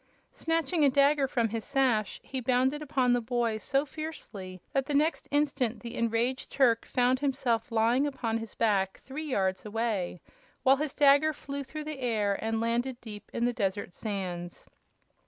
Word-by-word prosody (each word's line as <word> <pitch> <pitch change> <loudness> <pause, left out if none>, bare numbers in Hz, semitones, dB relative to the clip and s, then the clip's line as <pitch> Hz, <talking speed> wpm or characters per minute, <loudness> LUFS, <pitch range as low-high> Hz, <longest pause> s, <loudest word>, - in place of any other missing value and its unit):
Snatching 325 0 0
a 280 - +6
dagger 280 +1 +4
from 235 -3 +1
his 225 0 -3
sash, 240 -7 +1
he 265 - -4
bounded 255 +4 +1
upon 265 -4 +2
the 245 - +2
boy 235 -2 0
so 275 +5 +1
fiercely 235 -12 -7
that 270 -1 +1
the 290 - -1
next 310 +3 +1
instant 280 -5 0
the 235 -1 -7
enraged 230 +3 0
Turk 235 -4 +3
found 250 +1 +2
himself 260 -5 0
lying 230 +5 +3
upon 230 -5 -2
his 225 -1 -8
back 195 -4 +1
three 280 +4 -5
yards 190 -8 0
away, 210 -5 -2 0.4
while 270 0 +6
his 300 0 -3
dagger 285 +2 +5
flew 280 -1 -6
through 305 +3 -7
the 300 -2 -6
air 215 -6 0
and 225 0 0
landed 240 +2 -1
deep 210 -4 -10
in 235 - 0
the 245 - +1
desert 200 -5 -2
sands. 180 -5 -5
245 Hz, 170 wpm, -29 LUFS, 225-275 Hz, 0.4 s, a